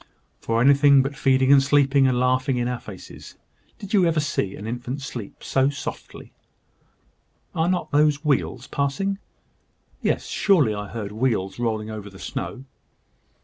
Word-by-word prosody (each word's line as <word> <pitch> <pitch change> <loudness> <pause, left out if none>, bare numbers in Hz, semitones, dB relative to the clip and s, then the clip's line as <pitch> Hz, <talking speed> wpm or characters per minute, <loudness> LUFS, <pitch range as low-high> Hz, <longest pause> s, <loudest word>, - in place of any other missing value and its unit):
"For 115 0 -1
anything 140 +1 +6
but 135 +1 -4
feeding 135 0 +3
and 140 -1 +7
sleeping, 140 -1 +3
and 125 -1 +1
laughing 130 +1 +1
in 120 0 0
our 125 -1 -3
faces. 95 -4 -11 0.4
Did 200 +1 -9
you 190 -4 +4
ever 165 -2 +1
see 105 -9 -2
an 105 - -9
infant 125 +4 -5
sleep 120 -6 -8
so 135 0 +2
softly? 140 -2 -8 1.2
Are 165 0 +1
not 185 -1 -1
those 150 0 +2
wheels 145 -3 0
passing? 195 +8 -2 0.8
Yes; - - 0
surely 155 - +2
I 105 0 -5
heard 105 -2 -6
wheels 110 -4 -1
rolling 110 -2 -2
over 105 -1 -7
the 95 - -14
snow." 130 +6 -6
135 Hz, 150 wpm, -23 LUFS, 115-145 Hz, 1.2 s, and